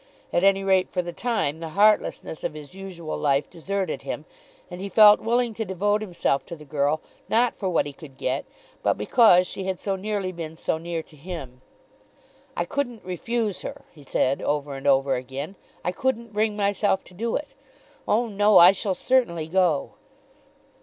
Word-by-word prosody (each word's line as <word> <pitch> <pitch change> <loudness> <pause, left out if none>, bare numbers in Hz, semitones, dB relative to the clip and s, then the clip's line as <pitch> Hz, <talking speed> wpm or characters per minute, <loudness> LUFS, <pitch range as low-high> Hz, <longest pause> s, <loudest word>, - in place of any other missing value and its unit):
At 175 - +2
any 195 0 +4
rate 190 -1 +3
for 180 - -1
the 175 0 -6
time 195 -11 -1
the 165 -1 -5
heartlessness 210 -6 +2
of - - -3
his 150 0 -10
usual 185 -4 -6
life 140 -1 +1
deserted 195 +3 -3
him, - - -5 0.5
and 180 +1 -7
he 200 - -4
felt 210 0 +8
willing 235 0 +1
to 220 - -3
devote 205 +2 0
himself 175 -8 0
to 170 - -6
the 150 -2 -13
girl 145 +1 0 0.3
not 240 +2 +2
for 190 - -2
what 175 - +2
he 145 - -6
could 135 -2 -13
get, - - -2 0.4
but - - +1
because 180 - +5
she 190 - -5
had 190 -1 -2
so 195 -1 -1
nearly 195 -1 -2
been 165 -2 -7
so 160 - -1
near 165 -1 -4
to 155 - -19
him. 140 -5 -8 1.0
"I - - 0
couldn't 245 -7 -3
refuse 210 +3 -2
her," - - -7
he 155 - -16
said 135 0 0
over 145 -1 -1
and 135 0 -5
over 135 0 +4
again. 135 +7 -5 0.3
"I 180 - +1
couldn't 235 +1 -2
bring 210 0 +1
myself 200 -1 +1
to - - -17
do 225 +5 -2
it. 295 - -4 0.5
Oh, 230 +3 +2
no; 205 0 +4
I 175 +2 +10
shall 195 0 -1
certainly 180 -13 +1
go." 170 -4 +1
185 Hz, 185 wpm, -25 LUFS, 155-210 Hz, 1.0 s, I